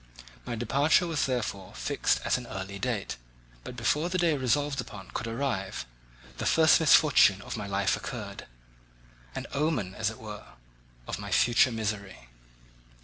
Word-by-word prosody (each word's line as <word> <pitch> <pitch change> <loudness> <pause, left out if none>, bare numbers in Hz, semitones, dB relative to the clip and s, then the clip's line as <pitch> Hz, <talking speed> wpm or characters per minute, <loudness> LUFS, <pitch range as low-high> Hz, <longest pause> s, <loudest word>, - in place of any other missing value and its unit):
My 120 - -2
departure 140 +9 +3
was 160 -6 0
therefore 105 -7 -3
fixed - - 0
at - - +2
an 125 -1 -4
early 95 0 -6
date, 110 -2 -2 0.5
but 125 - -8
before 150 +8 +1
the 185 - -1
day 170 -3 +3
resolved 140 +1 0
upon 100 -5 -10
could 115 - -4
arrive, 115 - -2 0.5
the - - -1
first 160 0 +5
misfortune 150 -10 +6
of - - -5
my 105 -3 -5
life 100 -1 +1
occurred—an - - -10
omen, 140 - 0
as 100 - -1
it 110 - -9
were, 105 - -10 0.5
of - - -4
my - - -6
future 120 +1 +4
misery. 100 - -4
115 Hz, 145 wpm, -28 LUFS, 95-140 Hz, 0.5 s, misfortune